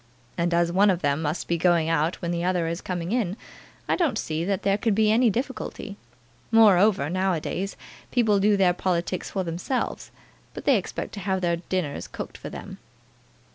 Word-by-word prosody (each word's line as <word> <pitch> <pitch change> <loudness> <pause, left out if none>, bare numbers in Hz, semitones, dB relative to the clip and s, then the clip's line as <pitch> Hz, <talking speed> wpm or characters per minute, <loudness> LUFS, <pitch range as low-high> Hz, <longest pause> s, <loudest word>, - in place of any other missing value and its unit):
And 170 +1 0
as 170 0 +2
one 200 +3 +4
of 180 -3 0
them 145 +1 +1
must 155 +2 -2
be 170 -1 0
going 170 -2 +3
out 165 +1 +1
when 170 - -1
the 170 0 -2
other 180 -2 +1
is 170 +2 -3
coming 175 -1 -4
in, 215 -5 0 0.5
I - - +2
don't 310 -11 +1
see 160 -4 -2
that 195 +1 -1
there 200 +1 +2
can 220 -2 +1
be 215 0 +3
any 235 +2 +4
difficulty. 230 -3 -4 0.5
Moreover, 205 -7 +5
now 185 +3 0
a 165 - -1
days, 195 +5 -4 0.3
people 220 -5 +3
do 205 +1 +3
their 185 -2 +4
politics 180 0 -2
for 190 - -2
themselves, 175 +9 -3 0.5
but - - -7
they 275 -4 +5
expect 190 - -5
to 205 - -6
have 190 -1 -1
their 170 -1 +1
dinners 170 -4 -3
cooked - - -8
for - - -7
them." - - -9
185 Hz, 195 wpm, -25 LUFS, 170-205 Hz, 0.5 s, Moreover